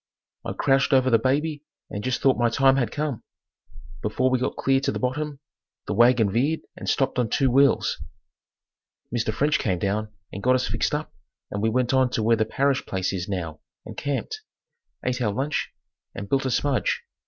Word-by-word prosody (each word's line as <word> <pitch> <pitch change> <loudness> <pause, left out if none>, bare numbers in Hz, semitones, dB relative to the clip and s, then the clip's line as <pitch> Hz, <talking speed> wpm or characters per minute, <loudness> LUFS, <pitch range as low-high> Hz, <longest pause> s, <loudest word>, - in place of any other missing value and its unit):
I - - -4
crouched 135 0 +2
over 130 -1 +4
the 115 - +5
baby 145 +4 0 0.3
and 100 - -4
just 130 -1 -1
thought 135 -1 +5
my 120 -1 +2
time 135 +2 +4
had 120 -5 +1
come. 145 -6 -3 0.8
Before 130 0 0
we 130 - +2
got 130 - -2
clear 135 0 +2
to 135 - -1
the - - -3
bottom 140 +3 -2 0.5
the - - -2
wagon 120 -1 +4
veered 140 +9 +1
and - - -5
stopped 135 -2 +1
on 120 -3 +1
two 135 +3 +2
wheels. 140 +2 +3 1.1
Mr. 115 -2 0
French 145 +7 +1
came 95 -7 0
down 105 +4 -2 0.2
and 100 - -5
got 130 +3 +3
us 130 - 0
fixed - - 0
up - - -5 0.4
and 100 - -3
we 110 - +2
went 125 +2 +1
on 130 -1 +4
to 110 - 0
where 115 +1 +4
the 110 -1 +1
Parrish 135 +4 +1
place 95 0 -2
is 95 0 -4
now 85 -5 -4 0.3
and - - -8
camped, 145 - -3 0.6
ate 125 0 -1
our 105 -4 +1
lunch 135 +7 -2 0.4
and 100 - -6
built 135 +4 +1
a - - 0
smudge. 135 +2 0
130 Hz, 195 wpm, -24 LUFS, 110-135 Hz, 1.1 s, the